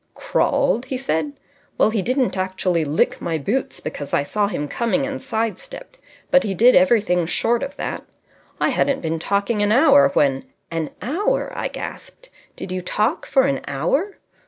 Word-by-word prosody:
"Crawled?" 240 +3 +1
he 260 0 -3
said. 260 - -2 0.4
"Well, - - +3
he 220 -3 0
didn't 255 +3 0
actually 185 -3 0
lick 150 +1 0
my 165 -2 -1
boots, 215 - -2
because 145 - -4
I - - +2
saw 205 +7 0
him 150 -7 -3
coming 235 - 0
and 275 0 -5
side 225 -4 -2
stepped; - - -12 0.3
but 270 - +6
he 195 -3 -2
did 240 +6 +6
everything 180 -3 +3
short 235 +6 +1
of 275 +1 -5
that. - - -4 0.6
I - - +2
hadn't 280 - +1
been 165 0 -2
talking 200 +5 0
an 205 0 +2
hour 235 - +6
when 135 -2 +2
" - - -47
"An 165 -2 -2
hour!" 410 - -1
I - - -2
gasped. - - -9 0.2
"Did 185 - -7
you 185 0 -2
talk 210 +4 -1
for 265 - +3
an 275 0 0
hour?" 225 - -1
215 Hz, 180 wpm, -21 LUFS, 170-270 Hz, 0.6 s, but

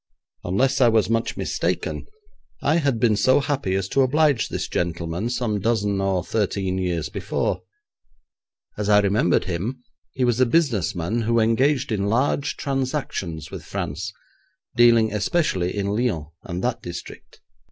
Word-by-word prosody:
Unless 130 +9 +1
I 125 - +7
was 110 -3 +3
much 115 0 0
mistaken, - - -2 0.6
I 155 +4 +3
had 140 -8 +1
been 110 -2 +3
so 130 +6 +4
happy 140 -9 -1
as 95 -1 -1
to 135 - +2
oblige 145 -1 +2
this - - -3
gentleman 85 +4 -2
some 120 -4 -1
dozen 105 -2 0
or 95 -2 0
thirteen 95 -3 -1
years 85 -4 -1
before. - - -2 1.2
As 105 0 -1
I 105 -1 +6
remembered 100 -3 +2
him, 100 +9 -4 0.3
he 130 - -1
was 120 -1 +2
a 130 - +4
business 120 - +1
man 90 +8 -1
who 115 +1 +2
engaged 125 +5 +2
in 100 -2 0
large 140 +5 0
transactions 130 - -3
with - - -7
France, 90 +8 -4 0.6
dealing 115 -3 +5
especially 105 - 0
in 100 - -1
Lyons 105 -11 -1 0.2
and 90 0 -4
that 120 -1 -1
district. 85 - -9
110 Hz, 150 wpm, -23 LUFS, 95-130 Hz, 1.2 s, I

